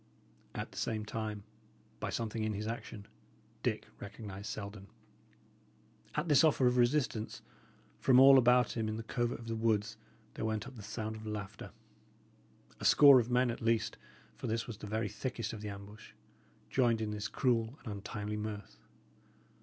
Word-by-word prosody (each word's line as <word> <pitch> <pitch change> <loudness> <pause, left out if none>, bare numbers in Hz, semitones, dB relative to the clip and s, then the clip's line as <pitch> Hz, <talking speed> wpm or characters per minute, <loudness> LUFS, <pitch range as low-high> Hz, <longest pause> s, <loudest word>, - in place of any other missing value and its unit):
At - - -4
the - - -7
same 110 -2 -2
time, 105 -2 -4 0.6
by - - -3
something 115 -1 -2
in 110 0 0
his 105 +1 -4
action, 110 -2 -6 0.5
Dick - - -1
recognised 100 -1 -8
Selden. 100 -2 -6 1.3
At 150 +3 -1
this 145 -2 +6
offer 150 -4 +4
of 125 0 +4
resistance, 120 -3 +1 0.6
from 130 -1 +5
all 135 0 +9
about 125 0 +4
him 110 -2 -1
in 110 - -3
the 115 - -5
covert 120 +1 -1
of 115 - -11
the 115 - -2
woods 110 -1 0 0.4
there - - -5
went 110 -1 -1
up 135 0 -10
the 110 - -9
sound 110 +1 -4
of 110 0 -9
laughter. 105 -1 -6 1.1
A - - -8
score 140 -3 +9
of 120 0 -1
men, 125 0 +3
at 115 - -7
least, 115 -1 +1 0.4
for - - -5
this 115 +1 -1
was 110 -4 -8
the 105 - -7
very 110 +1 -1
thickest 110 +2 -4
of 110 - -7
the 105 - -4
ambush, 100 +1 -10 0.6
joined 120 -3 +3
in 110 -1 -2
this 105 -1 -3
cruel 115 +2 0
and 110 -5 -5
untimely 105 +1 -4
mirth. 105 -1 -6
110 Hz, 170 wpm, -33 LUFS, 105-120 Hz, 1.3 s, all